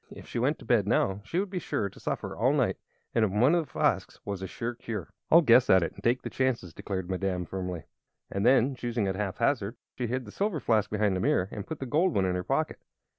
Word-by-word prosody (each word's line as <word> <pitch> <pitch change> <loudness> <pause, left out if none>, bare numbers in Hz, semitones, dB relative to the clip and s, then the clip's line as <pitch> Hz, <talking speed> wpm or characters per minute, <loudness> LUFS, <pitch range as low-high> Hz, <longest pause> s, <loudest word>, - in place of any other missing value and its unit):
If - - -11
she - - -3
went 140 +6 +1
to - - -13
bed 115 -4 +3
now 100 -2 +1
she 165 +11 -2
would 195 -1 -2
be 185 - -2
sure 100 - -1
to 95 - -13
suffer - - -3
all - - +2
night, - - +1 0.4
and 115 - +3
in 105 0 +1
one 130 +7 +5
of 170 -1 +3
the - - -18
flasks - - 0
was 100 -2 -4
a 95 - -4
sure 115 +5 -4
cure. 110 - -6 0.2
"I'll 170 +2 +7
guess 120 -2 +6
at 95 -2 +6
it, - - -2
and - - -13
take 120 +2 +2
the - - -4
chances!" 125 -10 -1
declared 95 0 -4
Madame, 95 -1 -1
firmly. 90 -2 -4 0.5
And 100 - -1
then, 130 +2 +4
choosing 120 -4 -2
at 95 - -1
haphazard, 105 +3 0 0.2
she 125 - -2
hid 125 +2 -2
the 105 - -10
silver 200 - -1
flask 110 -5 +1
behind 105 -2 +1
the - - -1
mirror 95 0 +1
and 100 -1 -6
put 160 - -4
the 135 - -5
gold 165 +8 +2
one 95 - +3
in 90 - +1
her 90 0 -2
pocket. - - -1
110 Hz, 255 wpm, -28 LUFS, 95-130 Hz, 0.5 s, I'll